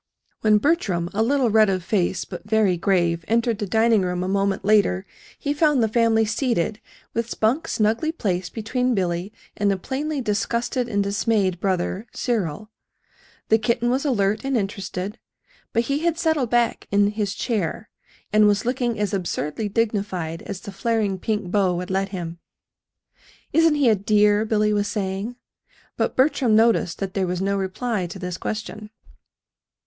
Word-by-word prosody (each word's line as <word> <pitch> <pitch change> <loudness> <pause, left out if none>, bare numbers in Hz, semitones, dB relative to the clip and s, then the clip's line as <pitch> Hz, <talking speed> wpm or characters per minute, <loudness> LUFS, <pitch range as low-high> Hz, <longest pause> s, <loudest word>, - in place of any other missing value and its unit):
When 215 -1 +4
Bertram, 200 - 0
a 210 - 0
little 255 0 +2
red 215 -1 +5
of 185 -2 -1
face, 185 -2 0
but 195 +2 -9
very 215 -4 +3
grave, 170 -2 +1
entered, 230 -1 +1
the 205 - -2
dining 225 +1 +3
room 180 -1 -1
a - - -2
moment 195 0 0
later, 200 -2 +3 0.3
he 285 - -2
found 295 -4 +3
the - - +3
family 225 0 +3
seated 220 - -1 0.3
with 230 0 -2
Spunk 235 +10 0
snugly 225 +9 +1
placed 185 - -2
between 250 +3 0
Billy 180 0 -1 0.2
and 205 -1 +1
a 195 - 0
plainly 285 +9 -3
disgusted 235 +2 -1
and 205 -2 +1
dismayed 200 -2 0
brother, 190 +3 -1
Cyril. 215 - -2 0.8
The 220 - +5
kitten 235 +2 +1
was 260 +2 0
alert 215 -7 +1
and 270 -2 0
interested; 195 0 -4 0.5
but 230 - +1
he 280 +4 -1
had 330 0 0
settled 315 -8 +1
back 240 -1 +1
in 205 0 +3
his 205 -2 -2
chair, 215 -3 -2 0.5
and 215 0 +6
was 205 +1 +2
looking 245 -2 -1
as 205 -1 -1
absurdly 185 +1 -2
dignified 200 -7 -1
as 200 -2 -5
the 200 - -8
flaring 210 -2 -1
pink 210 -3 -2
bow 190 -3 +2
would 180 +1 -4
let 195 +1 0
him. 170 -3 -6 1.1
"Isn't 325 -2 +4
he 285 -3 +3
a 225 - +6
dear?" 210 +1 +3
Billy 215 -1 +2
was 205 0 +1
saying. 200 +3 -3 0.6
But - - -1
Bertram 260 -4 +3
noticed 220 -6 +3
that 195 -1 -4
there 195 -3 0
was 180 0 -2
no 195 +1 0
reply 195 +1 -2
to 175 - -8
this 180 -1 -5
question. 215 0 -5
210 Hz, 165 wpm, -23 LUFS, 190-235 Hz, 1.1 s, and